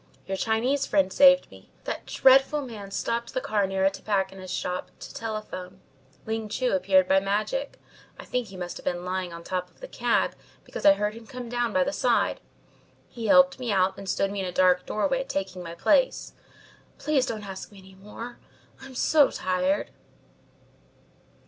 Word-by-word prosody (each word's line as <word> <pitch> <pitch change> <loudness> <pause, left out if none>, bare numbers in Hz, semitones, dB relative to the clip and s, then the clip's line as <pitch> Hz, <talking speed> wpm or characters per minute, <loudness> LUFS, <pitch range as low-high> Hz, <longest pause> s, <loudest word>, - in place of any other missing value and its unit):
"Your 195 - -3
Chinese 240 +7 0
friend 190 -2 +2
saved 275 -1 +6
me. - - -16
That - - -5
dreadful 270 +3 +4
man 215 -6 -8
stopped 235 +4 -3
the - - +2
cab 205 -5 0
near 190 0 0
a 195 - +4
tobacconist's 190 -2 -2
shop 180 0 -3
to - - -10
telephone. 215 -4 -6 0.5
Ling 220 -1 -3
Chu 255 +3 0
appeared 190 0 +3
by 190 0 +5
magic. 210 - -2 0.4
I - - -9
think 250 -2 -2
he 190 -1 -11
must 175 -1 -5
have - - -11
been 175 0 -2
lying 185 -1 -3
on 170 0 -9
top 180 0 -3
of - - -29
the - - -8
cab, - - +1 0.3
because - - -1
I 295 - +9
heard 210 -6 -1
him 225 0 -12
come 250 -1 -7
down 240 -1 -1
by 280 0 +3
the 285 +2 -2
side. 245 -4 +1 0.7
He 230 -3 -5
helped 275 -1 +5
me 245 -3 -2
out 190 -1 +2
and 195 -1 -8
stood 195 +1 0
me 200 - -4
in 190 - -2
a - - -4
dark 180 0 +3
doorway, 265 +5 0
taking 195 -6 -4
my 170 -1 -7
place. - - +2 0.6
Please 280 -4 +1
don't 215 -2 -4
ask 190 +1 -8
me 200 - -15
any 190 0 -15
more. 210 +5 -10 0.4
I - - -9
am 260 - -13
so 295 +2 +4
tired." 185 +1 -1
210 Hz, 185 wpm, -26 LUFS, 190-250 Hz, 0.7 s, I